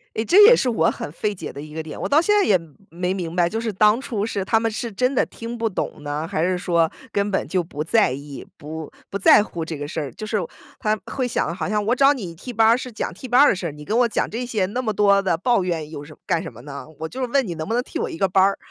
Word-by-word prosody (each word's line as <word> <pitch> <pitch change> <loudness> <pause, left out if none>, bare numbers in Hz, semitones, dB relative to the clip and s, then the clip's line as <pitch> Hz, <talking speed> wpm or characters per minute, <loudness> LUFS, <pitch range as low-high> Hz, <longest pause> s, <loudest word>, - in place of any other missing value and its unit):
诶， 220 - 0
这 380 - +6
也 485 +3 +9
是 260 - +1
我 190 -9 +2
很 145 - -6
费 210 +5 -2
解 165 - -7
的 140 - -7
一 150 0 -10
个 160 - -4
点， 155 - -8
我 - - -2
到 295 +3 +5
现 415 +5 +2
在 405 - +4
也 195 - +4
没 165 -4 -16 0.3
没 185 - +1
明 175 -4 -4
白， 175 -1 +3
就 220 +6 -3
是 230 - -2
当 210 +4 +4
初 220 -6 -2
是 205 -3 -2
他 225 +4 +2
们 225 0 0
是 230 +2 -4
真 250 +6 0
的 - - +3
听 230 +1 -7
不 230 -1 0
懂 185 - -4
呢， 145 +2 -3
还 155 - -1
是 180 +1 +1
说 170 -2 +1 0.2
根 200 0 +1
本 190 - -1
就 185 -2 0
不 150 -3 -7
在 205 - +3
意， 140 +1 -7
不 155 0 -7 0.2
不 200 - -3
在 - - +7
乎 170 -6 -5
这 160 -1 -5
个 145 0 -5
事 160 - -4
儿。 140 - -5
就 215 - -7
是 215 0 0 0.4
他 215 0 +1
会 260 - -2
想， 170 -8 -1
好 175 0 -3
像 210 0 0
我 240 - +3
找 275 +2 +5
你 195 -11 -6
替 250 - -8
班 225 -1 +4
儿， 230 - +5
是 255 0 -7
讲 215 - -4
替 225 +9 -9
班 250 +1 +4
儿 290 - +7
的 - - +2
事， 175 -3 -4
你 150 0 -11
跟 220 - 0
我 245 - +4
讲 230 - -1
这 240 +3 -4
些， 220 -6 0
那 245 +6 -3
么 225 -4 -1
多 200 -1 +4
的 185 -4 0
抱 235 +1 +2
怨 165 -4 -3
有 145 -2 -7
什 150 +1 -12
么 - - -23
干 165 - +1
什 165 - -7
么 115 0 -13
呢？ 140 0 -8
我 160 - -3
就 255 +9 -7
是 255 - 0
问 270 +2 +2
你 175 - -3
能 155 - -4
不 225 - -2
能 245 - +2
替 - - -6
我 - - -2
一 - - -7
个 195 - +2
班 190 +1 +4
儿。 195 +1 +2
195 Hz, 335 characters per minute, -22 LUFS, 160-230 Hz, 0.4 s, 也